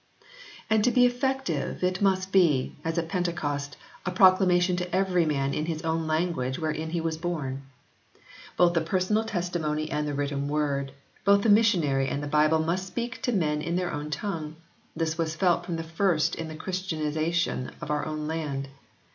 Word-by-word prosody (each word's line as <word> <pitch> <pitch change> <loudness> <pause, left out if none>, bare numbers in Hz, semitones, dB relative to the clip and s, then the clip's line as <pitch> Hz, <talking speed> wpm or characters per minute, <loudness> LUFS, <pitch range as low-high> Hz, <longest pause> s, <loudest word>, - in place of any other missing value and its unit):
And 220 -2 +3
to 250 - +4
be 245 0 +5
effective 245 - -1
it 180 +1 0
must 190 -1 +1
be, 160 -9 +3
as 165 +1 -2
at 165 -1 0
Pentecost, 150 -6 -2 0.3
a - - -2
proclamation 185 -1 +4
to 180 0 -2
every 185 -3 +2
man 140 -2 0
in 155 +3 -2
his 160 -1 -3
own 160 0 -1
language 155 -5 0
wherein 155 0 -2
he 170 +1 -1
was 160 -1 -2
born. 150 -6 -3 1.0
Both 175 -1 +5
the 165 - +2
personal 185 +6 +1
testimony 170 -6 -2
and 150 0 -1
the 145 - -2
written 140 0 -2
word, 145 -2 -1 0.3
both 200 +1 +4
the 225 - +3
missionary 170 -11 +4
and 140 +1 -2
the - - -3
Bible 150 +2 +3
must 170 +4 -1
speak 235 +6 -4
to 245 - 0
men 150 -8 0
in 170 +3 -2
their 180 -1 -1
own 150 0 -4
tongue. 155 -3 -4 0.4
This 160 0 -2
was 160 -1 -1
felt 175 0 +1
from 170 - -2
the 165 - -3
first 165 0 +1
in 165 - -4
the 155 - -7
Christianisation 160 -4 -2
of - - -5
our 150 0 0
own 155 -1 -4
land. 150 -4 -3
165 Hz, 180 wpm, -27 LUFS, 150-185 Hz, 1.0 s, be